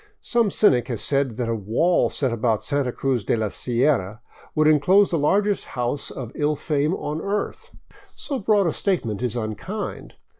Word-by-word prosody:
Some 235 -3 +1
cynic 125 - +3
has 120 -4 -3
said 135 -5 0
that 120 -2 -1
a 115 - 0
wall 115 - +1
set 130 -4 -1
about 115 -1 0
Santa 140 -3 0
Cruz 130 -3 -1
de - - +1
la 110 -2 -1
Sierra 120 -3 0 0.3
would 155 0 +4
enclose 185 +7 +4
the 165 - +1
largest 200 +7 +1
house 125 +3 -2
of 120 -4 -7
Ill 150 +1 0
fame 150 +3 0
on 150 -2 -4
earth. 205 +1 -3 0.5
So 275 -4 -4
broad 205 -2 +3
a 165 - +1
statement 120 - -1
Is 125 -2 -2
unkind. 120 - -5
140 Hz, 175 wpm, -23 LUFS, 120-180 Hz, 0.5 s, would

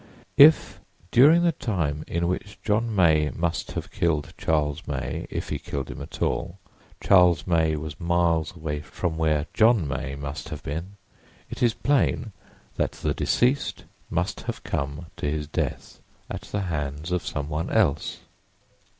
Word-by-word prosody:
If 155 +3 +7 0.3
during 155 +8 +7
the 170 - +4
time 85 - -2
in 85 +1 -1
which 105 +4 -3
John 110 +1 0
May 80 -5 +4
must 85 0 -2
have - - -5
killed 75 -4 0
Charles 75 -1 -1
May, 70 -2 -3
if - - -4
he - - -2
killed 70 -2 -5
him - - -8
at - - -5
all, 90 - -1 0.4
Charles 90 -6 +5
May 80 -3 +2
was 75 0 -6
miles 85 -2 +1
away 75 -2 -3
from 80 +2 -3
where 80 -2 +1
John 110 -7 +4
May 70 0 -3
must 70 +3 -6
have 75 -3 -7
been, 85 +8 -5 0.5
it - - -7
is 120 -2 +3
plain 135 -5 +1 0.5
that - - 0
the - - -2
deceased 130 +4 +1 0.3
must - - -1
have - - -4
come 70 +4 -3
to 75 - -1
his 75 0 -2
death 75 - -3 0.3
at - - -4
the 100 - -1
hands 75 -2 -3
of 90 -1 0
someone 75 +2 -3
else. 70 +1 +1
80 Hz, 155 wpm, -25 LUFS, 75-95 Hz, 0.5 s, If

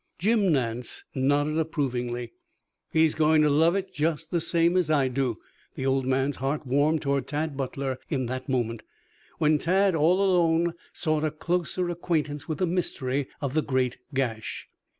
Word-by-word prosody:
Jim 205 0 +2
Nance 120 -4 -2
nodded 145 +3 +1
approvingly. 125 -6 -2 0.6
"He's 160 -1 +4
going 155 0 +4
to 150 - +3
love 165 +5 +4
it 195 -1 -3
just 155 +1 -1
the 170 - +1
same 170 +2 +2
as 180 -4 +2
I 145 -4 +3
do." 125 -3 -1 0.4
The 130 - -4
old 135 -1 +1
man's 135 +1 +1
heart 140 +3 -2
warmed 145 +5 +2
toward 140 -1 0
Tad 150 0 -2
Butler 135 -1 -3
in 130 -4 -1
that 130 +2 -5
moment, 120 -3 -1 0.6
when 155 -1 +3
Tad, 190 +4 +3
all 170 +5 +3
alone, 170 -3 +3 0.2
sought 155 -1 0
a 155 - +2
closer 175 +3 -1
acquaintance 155 -4 -2
with 155 -3 -2
the 185 - +1
mystery 140 -6 -1
of 140 -3 -2
the 155 - +2
great 130 -4 -1
gash. 120 -5 -3
150 Hz, 165 wpm, -26 LUFS, 130-165 Hz, 0.6 s, He's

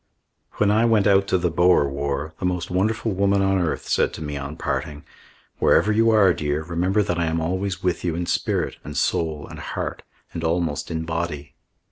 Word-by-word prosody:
When 105 -1 +2
I 110 +2 +3
went 110 -4 +3
out 100 -1 +4
to 95 - +2
the 90 -1 0
Boer 85 -3 +4
War, 70 +2 -3
the - - -3
most 90 -1 -3
wonderful 110 +4 0
woman 100 +1 +2
on 95 0 +2
earth 85 -3 -2
said - - +1
to - - -9
me 75 -1 -4
on 70 +2 -6
parting: 75 -1 -3 0.5
"Wherever 105 - +4
you 115 +2 +3
are, 105 -5 +5
dear, 75 0 -2
remember 90 +5 0
that 90 -4 -2
I 85 - +1
am 80 +1 0
always 95 +3 -2
with 90 -2 0
you 85 -2 -1
in 85 +1 -2
spirit - - -1
and 75 - -7
soul 80 -3 0
and - - -10
heart - - -4 0.3
and 85 - -5
almost 80 -2 -1
in 80 0 -3
body." 80 -3 -4
85 Hz, 200 wpm, -23 LUFS, 80-95 Hz, 0.5 s, are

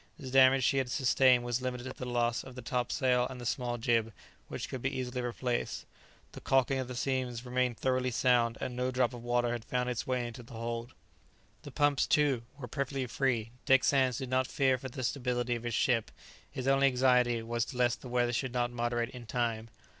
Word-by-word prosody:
The 130 -5 -8
damage 130 0 +6
she 135 - +3
had 130 -2 -2
sustained 130 -1 +4
was 120 +1 -1
limited 125 -1 -3
to 130 0 -6
the 125 - -6
loss 120 -1 0
of 130 -1 -11
the 125 - -8
topsail 125 +1 +1
and 130 -1 -8
the 120 - -7
small 120 0 -1
jib, 115 -1 +1 0.4
which - - -5
could 130 - -6
be 130 - 0
easily 125 -1 -3
replaced. 120 0 -2 0.5
The - - -10
caulking 135 0 +2
of 130 - -3
the 125 - -6
seams 125 -2 -2
remained 125 -1 0
thoroughly 130 -1 0
sound, 120 -1 +2
and 125 - -4
no 125 +1 -1
drop 125 -1 +1
of 120 -1 -9
water 120 0 +1
had 120 -2 -3
found 125 +1 -1
its 120 - -4
way 125 -1 0
into 120 +1 -7
the 120 +1 -14
hold. 115 +2 -5 0.7
The - - -9
pumps, 145 -2 +2
too, 145 -5 +3 0.2
were 130 -4 -7
perfectly 135 0 -2
free. 120 -3 -1 0.2
Dick 135 -1 +5
Sands 130 -4 +3
did 130 -1 -5
not 130 0 +2
fear 130 -2 +1
for 130 - -6
the 130 +1 -6
stability 125 -1 -1
of 120 - -3
his 120 -1 -3
ship; 115 -4 +1 0.4
his 130 0 -5
only 135 0 +4
anxiety 125 -2 +3
was 115 +1 -2
lest 125 -1 +1
the 125 - -9
weather 120 0 +1
should 125 +1 -2
not 120 -1 0
moderate 120 0 -1
in 120 -2 -10
time. 115 -1 -2
125 Hz, 215 wpm, -31 LUFS, 120-130 Hz, 0.7 s, damage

